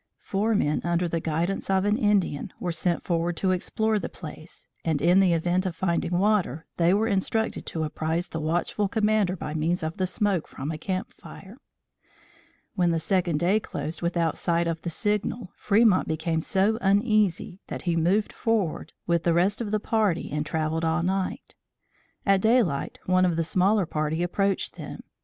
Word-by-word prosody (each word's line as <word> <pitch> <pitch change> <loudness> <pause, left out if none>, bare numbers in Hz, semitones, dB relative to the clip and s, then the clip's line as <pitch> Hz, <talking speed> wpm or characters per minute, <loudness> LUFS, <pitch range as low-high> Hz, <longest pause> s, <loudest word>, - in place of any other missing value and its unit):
Four 215 +3 -1
men 150 -6 +1
under 175 +1 +1
the 165 0 -1
guidance 165 +5 -2
of 190 0 +2
an 210 +1 +3
Indian, 205 - +1
were 175 - -2
sent 170 +1 -1
forward 170 -1 -1
to 190 - +1
explore 215 +4 0
the - - -5
place, 155 -1 -10 0.2
and, 160 -3 0
in 175 +5 +4
the 190 -2 +4
event 175 +2 +1
of 175 - -4
finding 175 -1 0
water, 185 -7 +1
they 170 0 +4
were 205 +3 +2
instructed 220 +1 -1
to 160 - -2
apprise 160 +2 -2
the 160 - -4
watchful 175 +6 0
commander 210 -2 +1
by 150 -4 -5
means 160 +3 0
of 160 +2 -3
the 185 - 0
smoke 200 -3 0
from 140 +4 -5
a 155 - -4
camp 185 +2 -3
fire. 200 +7 -13 1.1
When 180 -5 +2
the 165 - +1
second 175 -1 +1
day 185 +6 +3
closed 165 -6 -5
without 170 -2 0
sight 170 0 +1
of 165 -1 -2
the 170 - -3
signal, 210 +2 -2
Fremont 210 -2 +3
became 160 +1 -1
so 200 +6 +1
uneasy 200 -3 +2
that - - -6
he 175 -2 0
moved 180 +6 +1
forward 205 -9 -1
with 170 -1 +1
the 170 0 +2
rest 190 +6 +2
of 220 - -3
the 215 0 0
party 210 -5 0
and 150 +1 -1
travelled 160 +1 -2
all 165 +1 +1
night. 190 +6 -2 0.7
At 195 -1 +4
daylight, 220 - +2
one 185 0 +3
of 175 -2 +2
the 165 - +1
smaller 190 +4 +2
party 155 +1 -1
approached 195 +2 -1
them. - - -7
180 Hz, 180 wpm, -26 LUFS, 165-205 Hz, 1.1 s, in